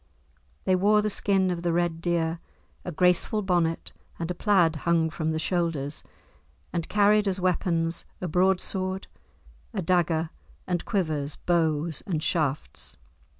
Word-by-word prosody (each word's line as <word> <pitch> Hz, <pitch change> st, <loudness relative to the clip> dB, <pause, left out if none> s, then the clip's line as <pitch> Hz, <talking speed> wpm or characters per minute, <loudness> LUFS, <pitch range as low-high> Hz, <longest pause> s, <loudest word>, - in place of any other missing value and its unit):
They 185 Hz, -, +3 dB
wore 210 Hz, +3 st, +4 dB
the 215 Hz, -, 0 dB
skin 195 Hz, -2 st, +2 dB
of 170 Hz, -1 st, -3 dB
the 175 Hz, -1 st, 0 dB
red 170 Hz, -1 st, 0 dB
deer, 170 Hz, -1 st, 0 dB, 0.4 s
a 180 Hz, -, -4 dB
graceful 180 Hz, +5 st, +2 dB
bonnet, 175 Hz, -3 st, 0 dB, 0.3 s
and 165 Hz, +1 st, -3 dB
a -, -, 0 dB
plaid 175 Hz, -5 st, +3 dB
hung 165 Hz, 0 st, +1 dB
from 160 Hz, -1 st, -2 dB
the 160 Hz, -, -1 dB
shoulders, 160 Hz, -4 st, -1 dB, 0.7 s
and 170 Hz, -1 st, -2 dB
carried 210 Hz, 0 st, +4 dB
as 190 Hz, -1 st, 0 dB
weapons 170 Hz, -2 st, 0 dB
a 180 Hz, -, -3 dB
broadsword, 185 Hz, +2 st, +1 dB, 0.7 s
a 195 Hz, -, -1 dB
dagger, 165 Hz, -2 st, +1 dB, 0.3 s
and 175 Hz, -2 st, -2 dB
quivers, 155 Hz, -8 st, -1 dB
bows, 160 Hz, -2 st, 0 dB
and 160 Hz, -5 st, -1 dB
shafts. 150 Hz, -5 st, -2 dB
175 Hz, 140 wpm, -26 LUFS, 160-185 Hz, 0.7 s, wore